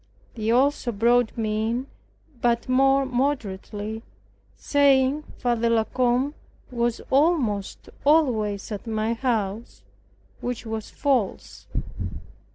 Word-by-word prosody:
They 220 -1 -3
also 255 +1 +2
brought 235 +2 +2
me 220 0 0
in, 245 +3 -2 0.5
but 235 -1 +1
more 270 +1 +4
moderately, 220 -5 -2 0.5
saying 280 0 +3 0.2
Father 235 -1 +1
La 230 -1 +3
Combe 255 +4 +1 0.4
was 235 -1 -1
almost 265 - +1 0.2
always 230 -10 +2
at 210 +2 -6
my 220 0 0
house, 230 -3 -2 0.6
which 245 -1 -4
was 220 -1 -4
false. 260 -9 -1
240 Hz, 100 wpm, -25 LUFS, 220-265 Hz, 0.6 s, more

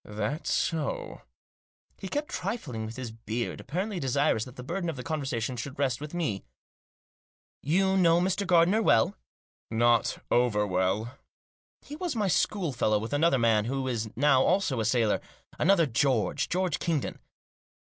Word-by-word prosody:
" - - -75 0.2
That 150 +8 -4
so?" 160 -4 -1 0.8
He 195 - -6
kept 290 +9 -3
trifling 145 - -4
with 110 - -8
his 125 -3 -6
beard, 115 +1 -4
apparently 185 - -3
desirous 135 -4 +1
that 125 - -12
the 125 - -8
burden 175 +5 -3
of 160 - -3
the 125 - -7
conversation 135 -6 -2
should 130 +4 -6
rest 130 -2 0
with 150 +3 -7
me. 120 - -2 0.6
" - - -89 0.2
You 190 0 +3
know 170 -2 +5
Mr. 190 +2 0
Gardiner 180 +4 +4
well? 115 - +3 0.2
" - - -
" - - -77
Not 120 +1 +2
over 115 -4 +3
well." 100 +6 -1 0.3
" - - -79
He 295 - -8
was 340 -3 -3
my 210 -3 +1
schoolfellow, 145 - +1
with 110 +5 -4
another 145 -1 +3
man 115 -3 +3
who 135 +2 -2
is 115 -3 -2
now 140 0 +4
also 180 -7 +1
a 110 - 0
sailor 110 -1 +2 0.2
— - - -25
another 170 0 +4
George; 130 -3 +1
George 180 -2 0
Kingdon." 160 -6 -2
135 Hz, 170 wpm, -28 LUFS, 115-175 Hz, 0.8 s, know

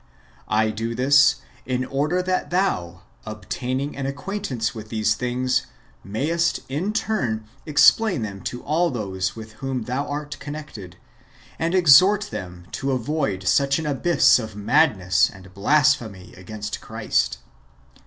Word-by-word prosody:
I 110 +1 +2
do 115 +2 -4
this, 135 +1 +5 0.3
in 130 0 -2
order 150 +8 0
that 185 0 -1
thou, 90 - -1 0.2
obtaining 125 +6 -4
an 135 -1 -3
acquaintance 140 - -3
with 110 -2 -9
these 110 -1 +1
things, 125 +2 -1 0.4
mayest 155 - -1
in 160 +10 -2
turn 125 - -1 0.2
explain 155 - +4
them 100 -2 -6
to 125 - -5
all 165 +4 +1
those 95 -6 -3
with 110 -1 -9
whom 135 -3 -2
thou 130 +5 -3
art 145 -1 -5
con 145 0 -6
nected, 105 - -9 0.6
and 165 +3 0
exhort 185 +5 +6
them 90 -1 -7
to 135 0 -2
avoid 125 -7 -2
such 140 +8 +3
an 160 - -4
abyss 150 0 +4
of 110 -3 -7
madness 95 -3 +3
and 95 -2 -14
of 95 - -16
blasphemy 115 -4 +1
against 105 +3 -7
Christ. 65 - -1
130 Hz, 140 wpm, -23 LUFS, 105-150 Hz, 0.6 s, exhort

